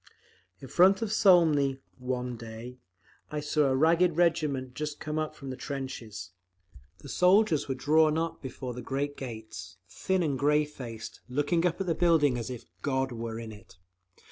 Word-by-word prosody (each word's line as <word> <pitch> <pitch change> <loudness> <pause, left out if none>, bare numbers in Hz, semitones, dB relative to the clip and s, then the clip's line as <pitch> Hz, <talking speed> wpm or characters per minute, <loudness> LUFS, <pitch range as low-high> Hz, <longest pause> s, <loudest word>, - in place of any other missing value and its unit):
In 135 - -8
front 190 - +4
of 220 -1 -2
Smolny, 160 -10 +4 0.2
one 125 -1 -3
day, 115 +2 -9 0.5
I 150 - -3
saw 150 0 +1
a 135 -1 +2
ragged 165 +3 +3
regiment 150 -7 +1
just 150 +2 -4
come 155 0 -2
from 135 -2 -8
the - - -5
trenches. 125 -9 -6 0.7
The 140 - -13
soldiers 180 0 +3
were 135 - -1
drawn 155 +3 +3
up 165 0 -2
before 130 -1 -6
the 125 - -7
great 140 +3 -2
gates, 110 -7 -8
thin 185 - -1
and 140 -5 -1
grey 150 +2 +3
faced, 120 -7 -9
looking 145 +6 +1
up 170 +1 -3
at 195 - -1
the 170 - +1
building 160 -7 +3
as 115 - -5
if 125 -2 -7 0.2
God 130 -1 0
were 115 -1 -5
in 115 -1 -7
it. 105 -3 -15
140 Hz, 170 wpm, -29 LUFS, 125-160 Hz, 0.7 s, front